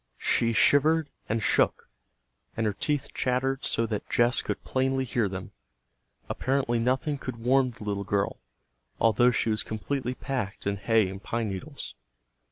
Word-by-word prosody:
She 115 0 +2
shivered 150 +6 +4 0.2
and 110 0 0
shook, - - +2 0.7
and 110 - +1
her 105 - +1
teeth 140 +7 -2
chattered 130 +1 0
so 115 - +1
that 105 -2 -4
Jess 120 +1 +3
could - - -4
plainly 130 0 0
hear 115 -4 0
them. 95 0 -6 0.8
Apparently 130 -3 0
nothing 130 +5 0
could 130 -2 -5
warm 130 0 +4
the 120 -2 -10
little 100 -1 -2
girl, 100 +1 -1 0.6
although 115 +2 +5
she 115 -1 +1
was 110 - +1
completely 125 +4 -3
packed 125 -9 -4
in 100 0 0
hay 110 0 +3
and 95 +1 -7
pine 115 0 -2
needles. 140 +10 -6
120 Hz, 155 wpm, -27 LUFS, 105-135 Hz, 0.8 s, although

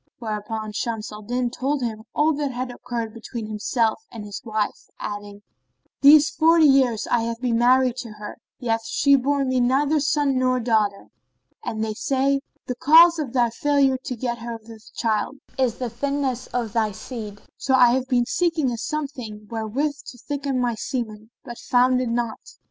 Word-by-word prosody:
Thereupon 215 -1 -4
Shams 220 0 -3
al 210 0 -9
Din 245 +3 -2
told 270 +2 -1
him 220 -2 -4
all 310 +2 +3
that 260 -4 -3
occurred 235 -2 -5
between 230 0 -7
himself 220 - 0
and 225 -3 -8
his 205 -2 -7
wife, 215 -2 -3
adding, 205 0 -7 0.6
"These 290 +1 +7
forty 325 0 +5
years 260 -6 +4
have 230 -1 0
I - - -37
been 240 -2 0
married 255 0 +4
to 235 -4 -6
her 210 0 -9 0.2
yet 245 -3 -3
hath 225 - -12
she 280 0 +4
borne 275 0 +1
me 255 0 +1
neither 275 +5 +2
son 285 -2 +1
nor 255 0 +2
daughter; 220 -4 0 0.5
and 220 0 -3
they 215 - -3
say:—The 275 +1 -1
cause 330 +5 +7
of 270 -6 -4
thy 240 -3 +2
failure 275 +1 +2
to 250 - -3
get 235 0 -3
her 230 0 -5
with 225 -1 -13
child 220 +2 -1 0.2
is 250 -3 +2
the 250 0 -3
thinness 265 0 -2
of 235 -4 -3
thy 220 -3 +1
seed; 215 -2 -7 0.2
so 265 - +1
I 245 -2 +6
have 260 0 0
been 245 -2 +2
seeking 325 -1 0
a 235 - -4
some 305 +4 -2
thing 220 -7 -9
wherewith 230 +7 -1
to 245 - -9
thicken 280 0 -3
my 245 -1 +1
semen 220 -2 -5
but 240 -2 -9
found 250 +1 +3
it 250 - -2
not." 235 -1 -2
245 Hz, 180 wpm, -23 LUFS, 225-275 Hz, 0.6 s, These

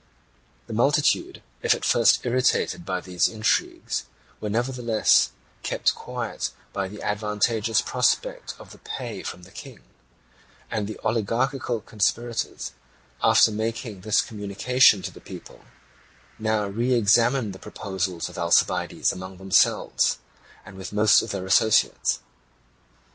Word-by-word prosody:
The 115 - -8
multitude, 145 - +1 0.2
if 460 -2 +3
at 470 - -5
first 115 0 +4
irritated 125 -7 +1
by 95 -1 -2
these 90 -1 +1
intrigues, 110 -1 -1 0.3
were 105 - -4
nevertheless 120 0 +2 0.3
kept - - 0
quiet - - -4 0.2
by 95 -1 -2
the 105 +2 -10
advantageous 105 +2 0
prospect - - 0
of - - -14
the - - -14
pay - - -6
from 90 - -7
the 90 - -15
King; - - -11 0.9
and 105 -2 -2
the 110 - -6
oligarchical 115 +2 -1
conspirators, 115 +2 -2 0.5
after - - +5
making 110 -1 -4
this 110 +2 +2
communication 105 +1 +2
to - - -4
the - - -14
people, - - -12 0.7
now 110 -1 0
re 120 +6 0
examined 115 0 +3
the 95 - -11
proposals 95 -4 -4
of 90 0 -9
Alcibiades 85 0 +2
among 95 0 -8
themselves, 95 0 +2 0.6
with 95 0 -8
most 105 +1 +5
of - - -6
their 95 -2 -4
associates. 105 +3 +2
110 Hz, 125 wpm, -24 LUFS, 100-120 Hz, 0.9 s, after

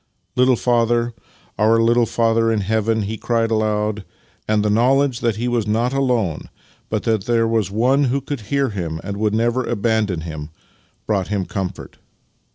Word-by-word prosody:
"Little 125 0 +4
Father 120 0 +1 0.2
— - - -30
our 110 +2 +4
Little 115 +1 +3
Father 115 0 +2
in 110 -2 0
Heaven!" 110 +2 0
he 110 +3 -4
cried 115 -1 0
aloud; 105 -1 0 0.4
and 105 -1 +1
the - - +2
knowledge 130 +3 +2
that 115 -2 0
he 120 +3 -2
was 120 -3 0
not 115 +4 0
alone, 120 - 0 0.4
but 110 -1 -2
that 110 -3 0
there 115 -2 +2
was 110 -4 0
One 125 +7 +2
who 135 +2 +1
could 140 -2 -5
hear 140 -1 +1
him 85 -6 -4
and 100 +1 -5
would 105 0 0
never 120 +3 +1
abandon 105 -5 0
him, 80 -2 -7 0.6
brought 100 -4 0
him 100 -2 -1
comfort. 95 -1 -6
115 Hz, 170 wpm, -20 LUFS, 105-120 Hz, 0.6 s, Little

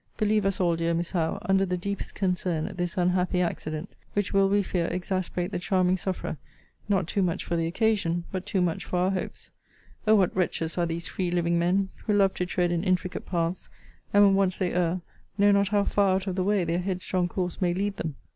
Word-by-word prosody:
Believe 215 -2 +2
us 195 - 0
all, 175 -2 +2
dear 165 0 0
Miss 170 +1 -2
Howe, 165 -4 0
under 195 0 +3
the 180 -1 -1
deepest 200 +2 -4
concern 180 -4 0
at - - -6
this 175 0 -2
unhappy 180 0 +1
accident; 160 -1 -3 0.2
which 205 0 -1
will, 195 0 +4
we 205 +1 +3
fear, 175 -3 -1
exasperate 185 0 -2
the - - -2
charming 185 0 +2
sufferer; 185 -4 -3 0.5
not 195 -4 +2
too 195 +4 -1
much 175 -3 -1
for 170 - -1
the 165 -1 0
occasion, 175 -3 +1
but 185 -1 -3
too 195 -4 +1
much 175 -2 0
for 180 - -3
our 180 +2 +2
hopes. 185 - -5 0.6
O 220 - +7
what 190 -4 +2
wretches 165 -3 -1
are 175 -1 +1
these 170 +1 -3
free 185 -2 -2
living 170 -1 +1
men, 190 +3 +2 0.2
who 210 - +3
love 195 -2 +4
to 180 - -2
tread 180 -1 0
in 170 0 0
intricate 185 -1 -1
paths; 170 0 -2 0.4
and, 205 0 +6
when 195 - +5
once 195 -1 +2
they 185 -2 -1
err, 180 0 +1 0.4
know 205 0 +5
not 200 0 +3
how 205 0 +2
far 200 -2 +2
out 190 0 -1
of 190 -2 -2
the 185 - 0
way 200 -1 +2
their 170 +1 0
headstrong 180 -1 -1
course 180 0 -3
may 180 -1 +2
lead 200 +3 -2
them! 155 -3 -4
185 Hz, 220 wpm, -27 LUFS, 175-195 Hz, 0.6 s, O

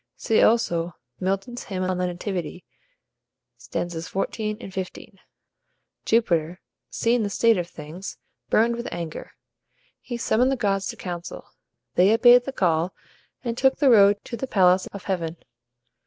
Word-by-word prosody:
See, 225 - +2
also, 175 -7 +2 0.2
Milton's 195 +6 -3
"Hymn 185 -2 -3
on 185 0 -1
the 180 - 0
Nativity," 180 -1 -5 0.9
stanzas 170 -2 -5
xiv. 210 +2 -2
and 195 -5 -9
xv.] 190 -2 -7 0.9
Jupiter, 175 -7 +1 0.3
seeing 235 +1 +1
this 205 -2 -2
state 230 -1 +4
of 175 - -3
things, 165 +4 -9 0.3
burned 235 +2 +3
with 235 +1 -5
anger. 170 -2 -6 0.7
He 240 - -5
summoned 245 +3 +2
the - - +1
gods 195 -4 0
to - - -5
council. 175 -2 -7 0.4
They 180 +7 +5
obeyed 245 +1 +6
the 270 - -3
call, 175 -6 0 0.5
and 235 -2 -2
took 265 +2 +3
the 275 -4 +4
road 205 -2 +6
to 235 - -5
the 265 - -4
palace 185 -4 +3
of 200 - -8
heaven. 170 -4 -3
195 Hz, 145 wpm, -24 LUFS, 175-230 Hz, 0.9 s, obeyed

